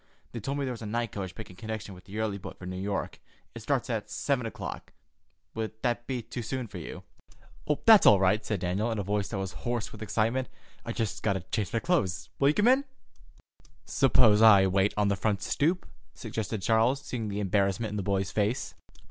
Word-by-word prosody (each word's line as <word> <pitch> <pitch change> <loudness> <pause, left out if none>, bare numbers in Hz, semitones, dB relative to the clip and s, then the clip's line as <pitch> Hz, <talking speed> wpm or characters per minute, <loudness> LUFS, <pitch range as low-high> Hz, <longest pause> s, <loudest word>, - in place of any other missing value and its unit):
"They 120 - -5
told 135 +6 -3
me 140 - -1
there 130 - -2
was 115 - -9
a 110 - -5
night 115 0 -2
coach 95 -3 -5
making 105 -5 -9
connection 110 -2 -5
with 90 - -14
the 100 +1 -8
early 110 -2 -1
boat - - -9
for 90 - -10
New 90 0 -5
York. 100 0 -3 0.3
It - - -8
starts - - 0
at - - -3
seven 125 -5 -1
o'clock. - - -7 0.6
Would 110 -1 -3
that 120 -1 -1
be 125 -3 -3
too 120 - -6
soon 130 +2 -3
for 100 -4 -8
you?" 80 - -8 0.8
"That's 220 -3 +8
all 100 - +8
right," 95 +3 +3
said 105 -5 -2
Daniel, 95 +6 0
in 115 - -2
a 100 - -1
voice 100 +1 -1
that 105 - -4
was 95 -2 -3
hoarse 120 +4 -3
with 110 - -11
excitement. 115 +4 0 0.3
"I - - -4
just 110 -3 -3
got 105 -2 +1
to 95 - -3
change 95 +1 -3
my - - 0
clothes. 110 - 0
Will 140 - +4
you 150 - +4
come 210 - +3
in?" 265 +3 +5 1.0
"Suppose 120 -6 +4
I 100 -4 +8
wait 95 +2 +2
on 105 -1 +3
the 100 - +2
front 100 0 -1
stoop," 170 +6 +1 0.3
suggested 110 -3 -4
Charles, 115 +6 +2
seeing 115 -4 -3
the 100 0 -3
embarrassment 100 +2 +1
in 105 - -3
the - - -1
boy's 95 -1 -1
face. 105 +3 -1
110 Hz, 215 wpm, -29 LUFS, 100-120 Hz, 1.0 s, That's